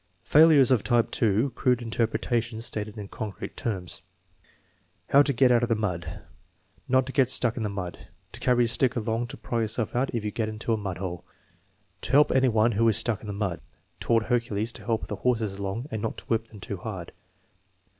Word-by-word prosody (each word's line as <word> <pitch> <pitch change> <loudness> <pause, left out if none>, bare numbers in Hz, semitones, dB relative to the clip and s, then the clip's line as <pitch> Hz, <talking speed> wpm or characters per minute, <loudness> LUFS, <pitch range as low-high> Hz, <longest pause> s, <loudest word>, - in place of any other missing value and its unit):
Failures 150 - +6
of 120 -5 +3
type 120 -2 +2
(2), 110 +4 +1
crude 125 -1 +1
interpretations 115 0 -1
stated 105 -1 -5
in 105 -2 -6
concrete 105 0 -6
terms: 95 -6 -4 1.1
"How 140 - +7
to 145 - +2
get 130 0 +4
out 120 -1 +4
of 120 - 0
the 115 - +3
mud." 90 -6 -3 0.7
"Not 130 0 +3
to 130 - -6
get 130 -2 +3
stuck 120 -3 +2
in 120 - -4
the 105 - -1
mud." 90 -3 -6 0.2
"To - - -9
carry 125 -1 +3
a - - 0
stick 125 +2 +2
along 115 +1 -1
to - - -9
pry 120 -1 -2
yourself 110 +1 -2
out 130 +2 +1
if 110 -2 -2
you 105 - -1
get 110 0 -2
into 110 +1 -2
a - - +3
mud 95 -4 -4
hole." 90 -2 -5 0.8
"To - - -5
help 145 +2 +6
any 130 0 +3
one 110 +1 +3
who 115 +2 +3
is 110 - +1
stuck 115 -2 -1
in 110 - -9
the - - -3
mud." 100 -4 -3 0.4
"Taught 115 -1 +2
Hercules 115 -1 -1
to - - -12
help 115 -2 -1
the - - -5
horses 110 -5 0
along 100 +7 -4
and 110 - -3
not 110 - -4
whip 115 0 0
them 105 - -13
too - - -5
hard." - - -7
115 Hz, 210 wpm, -26 LUFS, 105-120 Hz, 1.1 s, How